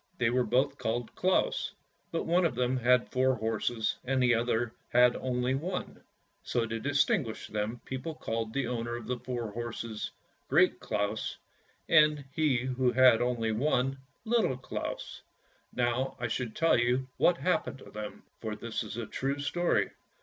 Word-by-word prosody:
They 115 -1 +2
were 125 0 +3
both 130 +5 +1
called 115 +1 -2
Claus, - - +1 0.4
but 165 - -1
one 175 +2 +3
of 165 - +1
them 125 +1 +1
had 125 0 +3
four 130 0 +3
horses, 110 0 -1
and 130 +1 0
the 120 -1 +5
other 115 0 0 0.2
had 125 0 +5
only 125 0 0
one; 175 +7 -4 0.4
so 120 -2 0
to 115 0 -3
distinguish 140 - +1
them 110 +3 -2
people 130 +5 -4
called 115 -5 -3
the 140 +2 -1
owner 120 -1 -2
of 120 -2 -7
the 125 -1 -2
four 120 -4 -4
horses 115 -1 -4 0.2
" - - -40
Great - - +4
Claus," 105 +1 -2 0.5
and 150 -2 +5
he 150 -3 +2
who 130 -1 +1
had 130 -3 +6
only 120 -2 0
one 135 +2 +1 0.2
" 170 - -43
Little 175 - +2
Claus." 125 - -5 0.5
Now 125 +2 0
I 120 - -1
shall 125 +1 -2
tell 160 +5 +3
you 125 +2 +1
what 175 - +4
happened 180 -6 0
to - - -14
them, 105 -1 -7 0.2
for 110 -2 -4
this 115 +1 -4
is 110 0 -6
a 120 - -3
true 135 +4 -2
story. 175 +5 +1
125 Hz, 170 wpm, -30 LUFS, 115-135 Hz, 0.5 s, had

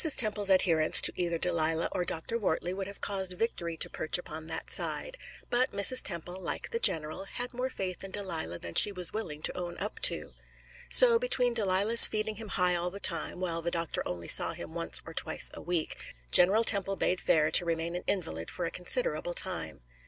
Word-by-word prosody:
Temple's 210 -3 +3
adherence 170 -5 +5
to - - +4
either 170 -1 -4
Delilah 165 -1 -1
or 180 - -4
Dr. 175 +7 -3
Wortley 180 -3 -4
would 190 0 -7
have 200 - -13
caused 190 -2 -2
victory 175 -5 -6
to - - -1
perch 155 - -2
upon 160 -3 -10
that 165 0 -6
side; - - -3 0.4
but 250 +1 -1
Mrs. 200 +6 +4
Temple, 175 +1 -4
like - - -6
the 465 - -4
general, 155 - -2
had 245 +5 -8
more 250 +2 -5
faith 190 -7 -7
in 195 - -10
Delilah 170 - -6
than 85 0 -11
she 205 - +3
was 180 -3 -5
willing 155 -9 -8
to - - -2
own 175 -1 -8
up 210 +2 -7
to. - - +3 0.6
So, 475 -2 +6
between 255 - -1
Delilah's 210 +1 +7
feeding 215 0 -5
him 225 0 -11
high 180 -2 -1
all 175 +1 -4
the 200 +3 -9
time, 170 -2 +1
while 170 -2 -5
the 170 - -4
doctor 165 -1 -5
only 85 -2 -8
saw - - +3
him - - -12
once - - -3
or - - -12
twice - - +3
a - - -11
week, 170 -2 -4 0.4
General 195 +6 +4
Temple 195 -3 +5
bade 185 -1 -3
fair 155 -1 -1
to 175 - +5
remain 165 0 -5
an 180 - -7
invalid 85 - -5
for 175 - -6
a 165 - -6
considerable 175 - +1
time. - - -2
180 Hz, 205 wpm, -27 LUFS, 165-205 Hz, 0.6 s, Delilah's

